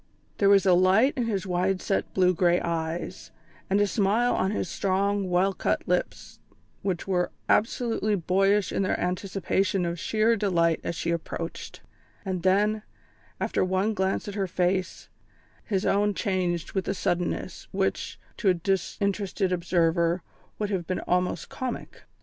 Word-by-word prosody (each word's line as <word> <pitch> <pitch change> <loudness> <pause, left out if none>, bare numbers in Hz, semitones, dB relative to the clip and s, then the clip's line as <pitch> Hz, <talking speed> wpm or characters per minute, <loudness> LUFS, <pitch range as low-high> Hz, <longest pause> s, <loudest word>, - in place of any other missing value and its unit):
There 200 - +5
was 200 -1 +5
a 185 - +6
light 190 +9 +4
in 245 -4 0
his 205 -3 -1
wide 185 +1 0
set, 195 - -1
blue 185 -1 +4
grey 175 0 +3
eyes, 165 0 -3 0.4
and 195 +1 +3
a 205 - +4
smile 210 +4 +2
on 190 - +1
his 205 -2 -2
strong, 195 +1 0
well 185 +2 +2
cut - - -1
lips 180 0 -2 0.4
which 185 -3 -2
were 180 -2 +1 0.2
absolutely 225 -1 +1
boyish 195 +3 +2
in - - 0
their 185 - 0
anticipation 190 0 0
of 170 0 -3
sheer 220 +3 +2
delight 170 -6 +1
as 170 - -3
she 170 - -2
approached; 170 0 -5 0.4
and 185 -2 -2
then, 210 +4 +2 0.6
after - - 0
one 190 +4 +1
glance 190 0 -1
at 205 - -4
her 195 -2 -1
face, 185 +1 -1 0.6
his 195 -3 -1
own 205 0 +2
changed 180 -5 -1
with 190 - -2
a 195 - 0
suddenness, 175 -1 -2
which, - - -2 0.2
to 205 - +2
a 185 - +4
disinterested 195 +1 -1
observer, 170 -1 +1 0.3
would 210 -1 -2
have 180 -4 -2
been 185 - -2
almost 180 0 0
comic. 255 -2 -6
190 Hz, 155 wpm, -26 LUFS, 180-200 Hz, 0.6 s, a